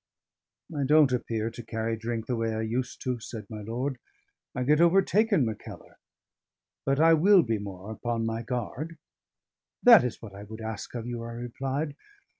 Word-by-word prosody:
"I 145 - 0
don't 150 0 +5
appear 115 -2 -1
to 120 - -8
carry 115 0 -2
drink 115 0 -4
the 125 - -1
way 115 -1 -1
I 110 - -2
used 120 +3 -3
to," 125 -2 -1
said 110 -1 -8
my 105 -1 -6
lord. 125 +5 -3 0.6
"I 125 - -1
get 150 +5 +4
overtaken, 195 - +4
Mackellar. 110 -2 -8 0.9
But 135 +1 +2
I 165 +1 +6
will 185 +3 +6
be 110 -2 -1
more 100 0 -7
upon 115 0 -2
my 115 0 -2
guard." 125 +7 -4 0.9
"That 235 -4 +9
is 125 -2 -3
what 105 -4 -10
I 100 - -9
would 110 +2 -9
ask 110 +1 -6
of 115 -2 -4
you," 120 -1 -4
I 115 0 -6
replied. 135 +5 -3
120 Hz, 175 wpm, -28 LUFS, 110-140 Hz, 0.9 s, That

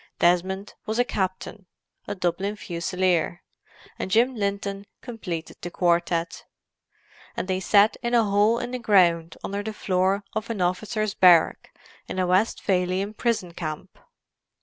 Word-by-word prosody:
Desmond 185 +3 +1
was 220 +1 -2
a 245 - +4
captain—a 190 -1 -6
Dublin 190 +3 -1
Fusilier; 175 -2 -1 0.6
and - - -3
Jim 235 +6 +3
Linton 200 -1 -3
completed 185 -9 -6
the 175 - -5
quartette; 170 -1 0 0.9
and - - -2
they 185 -1 0
sat 200 +3 +4
in 240 0 0
a 230 - +5
hole 205 +2 +3
in 245 +1 -4
the 255 - -3
ground 170 -7 +3
under 200 +1 -3
the 215 +1 -5
floor 190 0 0
of 220 +1 -3
an 225 -3 -3
officers' 210 +4 -1
barrack 175 -4 +4 0.4
in - - -6
a 185 - +1
Westphalian 185 0 +1
prison 215 -7 -1
camp. 155 -3 -6
190 Hz, 135 wpm, -25 LUFS, 180-215 Hz, 0.9 s, a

